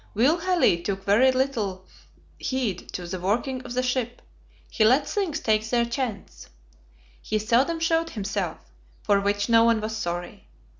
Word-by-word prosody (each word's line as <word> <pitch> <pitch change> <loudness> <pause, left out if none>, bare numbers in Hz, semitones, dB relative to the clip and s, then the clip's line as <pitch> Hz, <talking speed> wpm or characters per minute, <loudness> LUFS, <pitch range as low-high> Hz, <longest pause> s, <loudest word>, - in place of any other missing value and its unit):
Will 275 +11 +3
Halley 340 - +2
took 195 +1 -3
very 230 +7 +4
little 225 -8 -2 0.5
heed 245 -9 -3
to 180 - -5
the 180 +2 -5
working 235 +8 -1
of 245 -1 -7
the 255 - +1
ship; 245 -1 -2 0.4
he 220 - 0
let 260 +6 +4
things 360 -7 -2
take 220 -4 0
their 235 0 +2
chance. 235 -4 -5 0.7
He 215 - -1
seldom 245 +10 +1
showed 330 0 +1
himself, 200 - -3 0.5
for 200 -1 +3
which 205 0 0
no 230 -1 +5
one 230 -1 +3
was 215 +1 -4
sorry. 175 -4 -5
230 Hz, 155 wpm, -25 LUFS, 200-260 Hz, 0.7 s, no